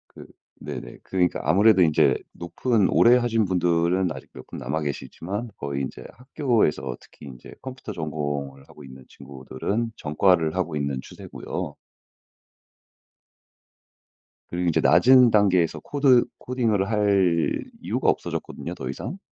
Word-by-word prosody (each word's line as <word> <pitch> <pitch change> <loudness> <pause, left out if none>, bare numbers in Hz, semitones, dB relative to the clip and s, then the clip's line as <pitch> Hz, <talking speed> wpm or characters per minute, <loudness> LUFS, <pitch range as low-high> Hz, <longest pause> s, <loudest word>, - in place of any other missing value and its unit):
그 - - -11 0.4
네네. - - -8
그러니까 90 -2 0
아무래도 95 +6 +4
인제 80 -3 +4 0.2
높은 100 +4 0
오래 120 +1 +5
하신 115 -3 +1
분들은 90 0 +1
아직 - - -11
몇 - - -12
분 - - -8
남아 75 +5 -3
계시지만 95 - -5
거의 70 -1 -4
인제 65 - -6
학교에서 115 - -1
특히 - - -16
인제 65 -3 -12
컴퓨터 130 -4 -8
전공을 70 -4 -4
하고 75 - -14
있는 65 -1 -13
친구들은 70 - -5
전과를 80 +1 +1
하고 90 -4 -2
있는 70 -2 -2
추세고요. - - -7 2.7
그리고 90 +1 -2
인제 80 - +2
낮은 125 -2 +6
단계에서 95 -5 +2
코드 135 -4 +3
코딩을 110 -6 -1
할 100 -6 +1 0.2
이유가 - - 0
없어졌거든요 85 - -3
더 65 -5 -6
이상. 110 - -6
90 Hz, 305 characters per minute, -24 LUFS, 75-110 Hz, 2.7 s, 낮은